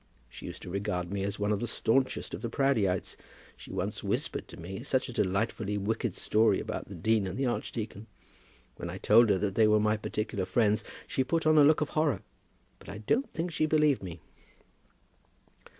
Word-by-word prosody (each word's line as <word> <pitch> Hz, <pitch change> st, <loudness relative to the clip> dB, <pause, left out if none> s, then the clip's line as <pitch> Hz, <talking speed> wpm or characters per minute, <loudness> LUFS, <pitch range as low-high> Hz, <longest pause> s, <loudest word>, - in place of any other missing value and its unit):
She -, -, -10 dB
used -, -, -8 dB
to -, -, -7 dB
regard 95 Hz, -3 st, -2 dB
me 100 Hz, -1 st, -2 dB
as 100 Hz, +1 st, -3 dB
one 105 Hz, 0 st, 0 dB
of 105 Hz, -, +1 dB
the 120 Hz, -, -2 dB
staunchest 130 Hz, +4 st, 0 dB
of -, -, -5 dB
the 115 Hz, -, -3 dB
Proudieites! 110 Hz, -9 st, +1 dB, 0.4 s
She -, -, -12 dB
once -, -, -3 dB
whispered -, -, -2 dB
to 85 Hz, -, -12 dB
me 95 Hz, +5 st, -6 dB
such 130 Hz, 0 st, 0 dB
a 125 Hz, -, -7 dB
delightfully 105 Hz, +1 st, 0 dB
wicked 105 Hz, 0 st, -1 dB
story 110 Hz, +1 st, +3 dB
about -, -, -5 dB
the -, -, -8 dB
dean 110 Hz, -2 st, +1 dB
and 95 Hz, -, -5 dB
the 135 Hz, -, 0 dB
archdeacon. 110 Hz, -3 st, -3 dB, 0.7 s
When 85 Hz, -, -5 dB
I 90 Hz, -, -5 dB
told 110 Hz, +4 st, +5 dB
her 100 Hz, -, +4 dB
that 100 Hz, 0 st, -1 dB
they 110 Hz, +1 st, +4 dB
were 105 Hz, 0 st, +4 dB
my 105 Hz, +1 st, +2 dB
particular 105 Hz, -2 st, -3 dB
friends, 105 Hz, 0 st, +2 dB, 0.2 s
she 130 Hz, -, 0 dB
put 165 Hz, +5 st, -1 dB
on 155 Hz, 0 st, +6 dB
a -, -, +8 dB
look 155 Hz, +2 st, +5 dB
of 150 Hz, -, 0 dB
horror. 155 Hz, -, 0 dB, 0.6 s
But -, -, -13 dB
I 100 Hz, -, -6 dB
don't 230 Hz, -, 0 dB
think 170 Hz, +2 st, -3 dB
she 155 Hz, -1 st, +1 dB
believed 150 Hz, -3 st, +3 dB
me." 85 Hz, -4 st, -8 dB
110 Hz, 200 wpm, -30 LUFS, 100-130 Hz, 0.7 s, a